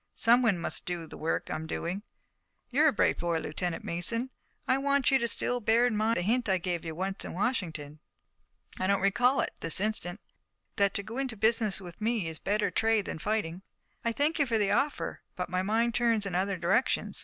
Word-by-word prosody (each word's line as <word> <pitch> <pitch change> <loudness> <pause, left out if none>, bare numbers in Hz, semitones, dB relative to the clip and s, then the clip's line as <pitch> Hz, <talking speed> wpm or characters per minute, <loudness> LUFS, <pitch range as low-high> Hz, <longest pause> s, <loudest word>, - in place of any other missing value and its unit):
Someone 235 -4 +5
must 170 - -4
do 175 -2 -3
the - - -11
work 160 - -2
I - - 0
am 160 0 -4
doing. 175 +4 -3 0.7
You're 295 +5 +5
a - - +5
bright 215 - +2
boy, 170 -1 0
Lieutenant 165 +2 -3
Mason, 175 +7 -1
and 260 - -6 0.4
I 260 - +3
want 280 -1 +2
you 260 -3 +3
still 245 +1 -1
to - - -17
bear 230 +3 +4
in 245 -3 +1
mind 220 +2 +1
the - - 0
hint 235 +5 +1
that 195 - +2
I - - +3
gave 175 -1 -2
you 165 -1 -5
once 190 +3 -3
in - - -6
Washington." 165 - -2 0.8
"I 185 - 0
don't 200 0 +3
recall 240 +7 +3
it, - - -3
this 165 +2 +1
instant." 205 -3 -2 0.6
"That 200 -1 +3
to 200 - 0
go 225 +5 -6
into 260 -5 -3
business 220 -1 +2
with 180 0 -11
me 220 -5 0
is 160 -1 -5
a - - -36
better 210 +1 0
trade 220 -2 +2
than - - -5
fighting." 185 -3 -2 0.4
"I 230 - +1
thank 295 +7 +1
you 285 - +3
for 230 -2 +1
the 205 -2 +1
offer, 290 +2 0
but - - -4
my 185 0 +1
mind 225 +4 +1
turns 230 -3 +2
in 195 - -4
other 190 +2 0
directions. - - +1
210 Hz, 225 wpm, -29 LUFS, 175-235 Hz, 0.8 s, Someone